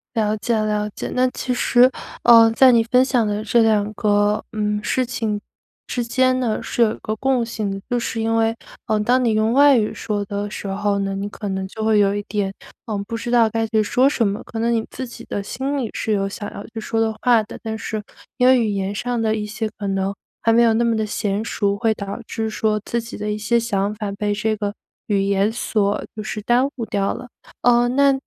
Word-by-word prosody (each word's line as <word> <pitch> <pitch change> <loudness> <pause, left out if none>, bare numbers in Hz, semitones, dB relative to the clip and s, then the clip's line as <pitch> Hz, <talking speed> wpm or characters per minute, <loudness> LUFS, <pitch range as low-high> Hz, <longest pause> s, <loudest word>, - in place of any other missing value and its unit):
了 215 -1 +1
解 235 +2 0
了 210 -1 0
解。 - - -4
那 255 0 +3
其 250 - -3
实， 245 +1 +4 0.3
呃， 230 -1 +8
在 255 +3 +6
你 230 -2 +4
分 250 +3 +4
享 250 -3 +1
的 210 0 -2
这 230 +2 +3
2 215 -2 +2
个， 205 0 +1
嗯， 210 -1 -1
事 255 +5 +1
情 220 -4 -2 0.5
之 245 - -2
间 255 +2 +2
呢， 235 -4 -1
是 - - -2
有 220 -1 +2
一 - - -9
个 215 - -3
共 260 +1 +1
性 220 -3 -3
的。 195 0 -5
就 245 -1 +1
是 225 -1 -3
因 225 0 0
为， 225 0 +2 0.3
呃， 215 - +1
当 250 +4 +2
你 230 - +3
用 215 +1 +2
外 285 +1 +6
语 215 -2 +1
说 205 -1 -3
的 205 +1 -4
时 205 - -6
候 200 +1 0
呢， 195 0 -2
你 200 +1 -3
可 205 -1 -6
能 190 0 -3
就 220 +3 -6
会 220 -1 +3
有 200 -1 +3
一 205 - -2
点 195 -1 -2 0.3
呃 220 - -3
不 230 - -3
知 235 +1 -4
道 235 -2 +5
该 225 +1 -1
去 220 0 +2
说 250 +5 +3
什 240 -6 +1
么。 200 +1 -3
可 225 - -7
能 230 +1 +1
你 225 -1 0
自 260 - -5
己 235 - -11
的 205 - -3
心 265 +7 -3
里， 235 -4 -2
是 220 - -2
有 195 -1 0
想 205 +1 -6
要 200 - -7
去 225 0 -7
说 225 +1 -1
的 225 0 +1
话 240 -3 +5
的。 215 - -10
但 220 -1 -3
是 220 -1 -4 0.4
因 250 - +4
为 260 -1 +6
语 225 -2 +1
言 195 -1 -2
上 245 +3 -2
的 220 -1 +1
一 215 - -3
些 220 +1 -3
可 205 - -3
能 195 0 -1 0.3
还 225 - +3
没 235 - +5
有 230 -1 +4
那 235 - +2
么 230 -1 +2
地 220 - 0
娴 205 0 -1
熟， 200 -3 0
会 225 +2 +1
导 200 +2 -6
致 220 -1 -3
说 215 0 0
自 235 - -1
己 230 +1 -9
的 210 0 -3
一 210 - -2
些 215 +3 +1
想 205 -3 -1
法 210 -1 -4
被 205 +1 -2
这 215 +1 0
个 205 -1 -2 0.3
语 200 -2 +1
言 200 +1 +2
所 210 -3 -1
就 215 - -5
是 215 0 -4
耽 245 +4 +3
误 235 - -4
掉 200 -1 -1
了。 250 0 -9 0.3
呃， 240 0 +4
那 280 +2 +4
220 Hz, 260 characters per minute, -21 LUFS, 205-235 Hz, 0.5 s, 呃